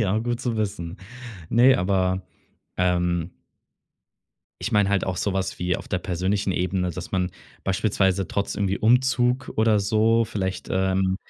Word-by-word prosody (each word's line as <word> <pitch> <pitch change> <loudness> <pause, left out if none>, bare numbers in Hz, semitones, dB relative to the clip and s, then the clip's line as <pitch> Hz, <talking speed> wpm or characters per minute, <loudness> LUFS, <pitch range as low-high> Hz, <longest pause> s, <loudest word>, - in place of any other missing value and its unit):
Ja, 105 0 +1
gut 120 +1 -2
zu 120 -3 -2
wissen. 100 -4 -3 0.5
Ne, 125 +3 +6
aber 95 0 +1 0.5
ähm 90 -1 +1 1.3
ich 115 - -3
meine 105 -2 +3
halt 100 -1 +1
auch 95 -2 -2
so 100 - -1
was 95 -1 -2
wie 90 0 0
auf - - -10
der 95 - 0
persönlichen 95 +3 -1
Ebene, 90 0 -1
dass 90 +1 -7
man 90 -1 0 0.3
beispielsweise 95 -1 +1
trotz 100 - -2
irgendwie 100 0 -1
Umzug 125 +2 +2
oder 110 -2 +3
so 110 +3 +3
vielleicht, 95 -3 -4
ähm 95 0 +1
95 Hz, 150 wpm, -24 LUFS, 90-110 Hz, 1.3 s, Ne